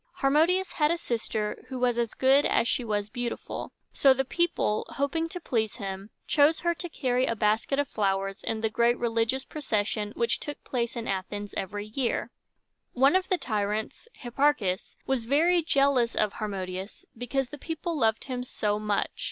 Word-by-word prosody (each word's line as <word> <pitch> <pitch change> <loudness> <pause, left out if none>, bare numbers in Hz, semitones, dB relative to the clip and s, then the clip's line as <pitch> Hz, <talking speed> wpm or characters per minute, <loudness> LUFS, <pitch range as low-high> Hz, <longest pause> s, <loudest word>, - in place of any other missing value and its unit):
Harmodius 325 +7 +3
had 300 -2 +2
a 335 - +1
sister 225 -7 -3
who 260 - -5
was 245 -1 +1
as 235 -2 -1
good 270 +2 +5
as 235 - +2
she 250 - +1
was 205 -2 -1
beautiful: 240 +2 -5 0.2
so 270 -2 +5
the 270 +1 0
people, 310 -8 +1
hoping 325 +4 -1
to 360 - -6
please 225 - -1
him, 195 -2 -6 0.2
chose 300 +2 +4
her 345 0 +2
to 350 +1 -6
carry 255 -4 0
a 230 - 0
basket 215 +5 +1
of 285 0 +1
flowers 195 -2 -1
in 220 -1 -3
the 220 - +1
great 235 +2 +3
religious 230 +2 0
procession 210 -7 -2
which 235 - +1
took 290 - -6
place 235 -2 -2
in 235 -1 -4
Athens 205 +2 -3
every 205 +2 -3
year. 235 +3 -2 0.6
One 270 +6 +4
of 375 0 +2
the 370 - +3
tyrants, 215 - -2
Hipparchus, 240 -7 0
was 265 -4 0
very 330 +7 +4
jealous 275 -6 +2
of 210 -2 +1
Harmodius, 190 -2 -5
because 245 +2 -2
the 295 - -9
people 330 +2 -3
loved 225 -6 +2
him 250 -2 -4
so 210 -4 -1
much. 210 -1 -1
240 Hz, 175 wpm, -28 LUFS, 210-280 Hz, 0.6 s, good